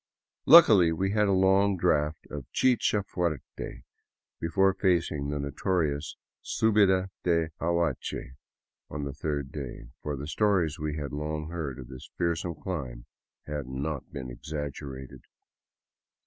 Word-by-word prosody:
Luckily 110 Hz, -, +9 dB
we 95 Hz, +4 st, 0 dB
had 105 Hz, 0 st, +3 dB
a -, -, +2 dB
long 95 Hz, +1 st, +4 dB
draught 75 Hz, -3 st, +1 dB
of 70 Hz, -4 st, -6 dB
chkha 120 Hz, -5 st, +3 dB
fucrte 85 Hz, -8 st, -4 dB, 0.6 s
before 95 Hz, +4 st, +3 dB
facing 85 Hz, -7 st, +1 dB
the 75 Hz, -, -2 dB
notorious 75 Hz, +1 st, -1 dB, 0.3 s
suhida 95 Hz, -4 st, +3 dB
de 85 Hz, -2 st, +1 dB
Aguache 85 Hz, -7 st, -1 dB, 0.6 s
on 75 Hz, 0 st, -4 dB
the 70 Hz, -1 st, -4 dB
third 70 Hz, -1 st, -3 dB
day, 65 Hz, -5 st, -7 dB
for 75 Hz, -1 st, -3 dB
the 70 Hz, -, -5 dB
stories 85 Hz, -2 st, +1 dB
we 75 Hz, 0 st, -3 dB
had 75 Hz, -1 st, -5 dB
long 75 Hz, +1 st, -3 dB
heard 75 Hz, -7 st, -4 dB
of 65 Hz, -, -9 dB
this 65 Hz, -1 st, -11 dB
fearsome 85 Hz, 0 st, -1 dB
climb 65 Hz, -9 st, -5 dB, 0.4 s
had 75 Hz, -3 st, -4 dB
not 70 Hz, +2 st, -4 dB
been 65 Hz, -3 st, -6 dB
exaggerated. 70 Hz, 0 st, -6 dB
80 Hz, 130 wpm, -28 LUFS, 70-95 Hz, 0.6 s, Luckily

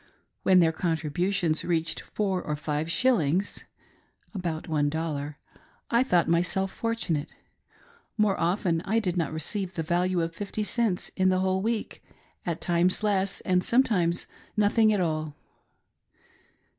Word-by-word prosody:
When 185 Hz, -1 st, +5 dB
their 165 Hz, -1 st, +4 dB
contributions 165 Hz, +1 st, 0 dB
reached 165 Hz, -1 st, -1 dB
four 195 Hz, -3 st, -2 dB
or 150 Hz, -, -3 dB
five 150 Hz, +1 st, -2 dB
shillings 190 Hz, -, +1 dB, 0.7 s
(about 170 Hz, -5 st, -3 dB
j^i) 150 Hz, -1 st, -1 dB, 0.6 s
I 235 Hz, 0 st, +4 dB
thought 180 Hz, -10 st, +2 dB
myself 180 Hz, +3 st, +1 dB
fortunate; 200 Hz, -10 st, -2 dB, 0.8 s
more 210 Hz, -3 st, +3 dB
often 170 Hz, -1 st, +1 dB
I 215 Hz, +4 st, 0 dB
did 190 Hz, -6 st, 0 dB
not 165 Hz, -5 st, 0 dB
receive 180 Hz, +4 st, -3 dB
the 165 Hz, -, -1 dB
value 175 Hz, +2 st, +1 dB
of 165 Hz, 0 st, -2 dB
fifty 205 Hz, +4 st, -3 dB
cents 215 Hz, -4 st, 0 dB
in 185 Hz, 0 st, +3 dB
the 185 Hz, 0 st, +2 dB
whole 190 Hz, 0 st, +1 dB
week, 225 Hz, +1 st, -3 dB, 0.4 s
at 170 Hz, -2 st, -2 dB
times 175 Hz, +3 st, +2 dB
less, 195 Hz, -2 st, +1 dB
and 180 Hz, -1 st, +1 dB
some 245 Hz, +7 st, +4 dB
times 175 Hz, -7 st, 0 dB, 0.3 s
nothing 215 Hz, +1 st, +4 dB
at 205 Hz, -3 st, +1 dB
all. 155 Hz, -3 st, -2 dB
180 Hz, 135 wpm, -27 LUFS, 165-200 Hz, 0.8 s, When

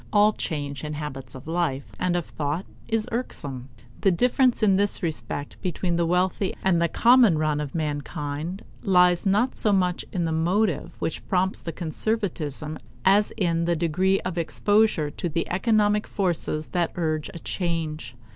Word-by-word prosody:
All 210 Hz, +1 st, +5 dB
change 145 Hz, -6 st, -4 dB
in 150 Hz, 0 st, -4 dB
habits 135 Hz, -4 st, -6 dB
of 130 Hz, -, -10 dB
life 160 Hz, -5 st, -1 dB
and 180 Hz, -1 st, +1 dB
of 175 Hz, -, -1 dB
thought 150 Hz, +5 st, -3 dB, 0.2 s
is 225 Hz, -1 st, 0 dB
irksome. 140 Hz, -, -4 dB, 0.3 s
The 195 Hz, -, +3 dB
difference 250 Hz, +5 st, +3 dB
in 195 Hz, -3 st, +5 dB
this 200 Hz, 0 st, +3 dB
respect 155 Hz, -3 st, -4 dB
between 180 Hz, -1 st, -1 dB
the 170 Hz, 0 st, +1 dB
wealthy 185 Hz, +2 st, +1 dB
and 175 Hz, -3 st, +3 dB
the 170 Hz, -, +3 dB
common 235 Hz, -2 st, +5 dB
run 155 Hz, -1 st, 0 dB
of 145 Hz, +1 st, -6 dB
mankind 150 Hz, +3 st, -3 dB, 0.2 s
lies 180 Hz, -1 st, +4 dB
not 210 Hz, +7 st, +2 dB
so 215 Hz, -, +2 dB
much 180 Hz, -3 st, +1 dB
in 175 Hz, -2 st, -1 dB
the 165 Hz, -, -1 dB
motive 175 Hz, +3 st, 0 dB
which 160 Hz, -, -3 dB
prompts 190 Hz, 0 st, +1 dB
to 165 Hz, -, -4 dB
conservatism 160 Hz, -, -3 dB, 0.3 s
as 200 Hz, +2 st, +4 dB
in 170 Hz, -4 st, +1 dB
the 170 Hz, 0 st, +1 dB
degree 180 Hz, +4 st, +1 dB
of 180 Hz, -1 st, -3 dB
exposure 205 Hz, -2 st, +2 dB
to 175 Hz, -, -3 dB
the 165 Hz, +1 st, -2 dB
economic 210 Hz, +2 st, +2 dB
forces 170 Hz, -5 st, -1 dB
that 175 Hz, -2 st, 0 dB
urge 155 Hz, -3 st, -1 dB
a -, -, -4 dB
change. 160 Hz, -, -3 dB
175 Hz, 165 wpm, -25 LUFS, 155-195 Hz, 0.3 s, All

